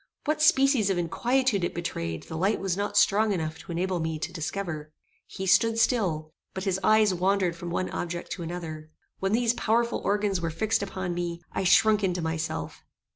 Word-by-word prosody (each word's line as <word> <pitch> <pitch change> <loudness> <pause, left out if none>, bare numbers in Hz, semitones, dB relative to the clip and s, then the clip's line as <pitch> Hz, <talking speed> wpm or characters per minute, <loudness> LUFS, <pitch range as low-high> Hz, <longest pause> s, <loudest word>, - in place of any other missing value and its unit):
What 305 0 0
species 270 -7 +4
of 190 - +1
inquietude 235 +5 +1
it - - -2
betrayed, 85 - -4
the 160 - -8
light 190 +6 +1
was 190 -3 -1
not 205 +1 -2
strong 215 +2 +4
enough 160 -3 -3
to - - -9
enable 180 +1 -1
me 160 -1 -2
to 155 - -5
discover. 160 -2 -4 0.4
He 190 - -6
stood 225 +5 +4
still; 180 -10 +1 0.2
but 190 - -3
his 190 -2 0
eyes 215 -1 +4
wandered 185 -1 +1
from 170 +1 -6
one 185 +2 -1
object 175 0 -4
to 180 - -4
another. 160 -2 -6 0.3
When 195 +1 0
these 235 0 +3
powerful 235 0 0
organs 200 -2 0
were 165 - -1
fixed 220 +8 0
upon 185 -2 -3
me, 175 0 -4
I 195 - -2
shrunk 210 +3 +5
into 180 -2 0
myself. 160 0 -3
185 Hz, 185 wpm, -27 LUFS, 170-215 Hz, 0.4 s, shrunk